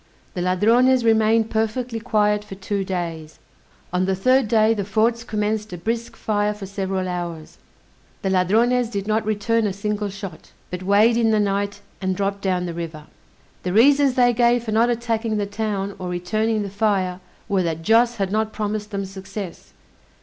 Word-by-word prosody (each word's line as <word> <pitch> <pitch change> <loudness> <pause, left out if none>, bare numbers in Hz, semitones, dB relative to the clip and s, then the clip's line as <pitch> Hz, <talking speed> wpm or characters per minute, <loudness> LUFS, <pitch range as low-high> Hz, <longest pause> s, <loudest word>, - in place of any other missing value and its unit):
The 180 - -3
Ladrones 230 +8 +3
remained 220 0 +3
perfectly 225 +2 -1
quiet 210 -3 +1
for 195 - -9
two 195 +1 -2
days. 165 -4 -4 0.6
On 180 +1 +1
the 190 0 +1
third 255 +5 +3
day 220 0 +4
the 205 -3 -2
forts 225 +4 +1
commenced 215 -2 -2
a - - -5
brisk 230 +6 -3
fire 210 -1 0
for 205 -1 -7
several 190 -1 -3
hours: 175 -3 -5 0.6
the 190 - 0
Ladrones 225 +6 +2
did 200 -3 -3
not 220 +1 +1
return 215 +1 +1
a 195 - -2
single 210 +1 -2
shot, 195 -4 -9 0.2
but 180 0 -4
weighed 205 +5 +4
in 230 -1 +3
the 215 -1 +3
night 200 0 -1 0.2
and 190 -1 0
dropped 200 +1 -2
down 180 -2 0
the 170 - -4
river. 165 -2 -6 0.6
The 180 - -3
reasons 275 +4 +5
they 245 -1 +4
gave 240 0 +3
for 220 - -4
not 225 +3 +3
attacking 230 -2 -1
the 205 - 0
town, 200 -1 -3
or 180 -1 -4
returning 215 +5 -1
the 200 - -6
fire, 195 -3 0 0.3
were 195 -2 +1
that 165 -2 -2
Joss 230 +4 +4
had 195 -3 -2
not 215 +1 0
promised 210 0 -3
them 200 -2 -3
success. 190 -1 -8
210 Hz, 180 wpm, -22 LUFS, 190-225 Hz, 0.6 s, reasons